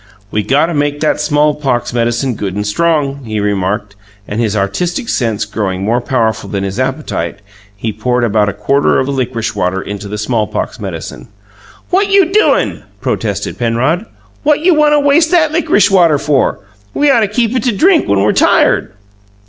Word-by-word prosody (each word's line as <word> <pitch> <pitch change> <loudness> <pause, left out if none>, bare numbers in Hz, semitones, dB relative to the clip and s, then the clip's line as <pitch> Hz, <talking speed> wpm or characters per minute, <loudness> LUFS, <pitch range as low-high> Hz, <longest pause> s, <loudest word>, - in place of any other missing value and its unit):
"We 105 - 0
got 135 +9 +2
to 170 - -3
make 145 -1 -1
that 155 - +1
smallpox 145 -5 0
medicine 120 +2 0
good 100 -3 -4
and 105 0 -2
strong!" 140 +3 0
he 110 -2 -3
remarked; 100 0 -2 0.3
and, 105 +3 -2
his 110 -2 0
artistic 170 - -2
sense 115 -4 -1
growing 95 -3 -3
more 120 +3 +1
powerful 110 -5 -1
than 100 -1 -2
his 100 +4 -4
appetite, 130 - -2 0.4
he 110 +2 -4
poured 125 +3 -1
about 105 -2 +2
a - - -4
quarter 135 +8 +1
of 130 - +1
the 140 - -3
licorice 125 -4 -2
water 90 +1 -1
into 100 +1 -6
the 105 +1 -5
smallpox 105 -1 -2
medicine. 60 - -7 0.6
"What 395 +2 +2
you 390 -3 +4
doin'?" 430 - +2 0.2
protested - - -3
Penrod. 130 - 0 0.3
"What 300 0 +2
you 360 +2 +4
want 300 -1 +3
to 295 - +4
waste 290 +3 +3
that 315 -3 +3
lickrish 315 -11 +2
water 170 -6 +4
for? 140 -5 0 0.3
We 290 -1 +3
ought 240 - +4
to 215 - +2
keep 230 +3 0
it 250 - +1
to 245 - +3
drink 355 -1 +3
when 100 -1 +2
we're 105 - +3
tired." - - +2
130 Hz, 180 wpm, -14 LUFS, -, 0.6 s, you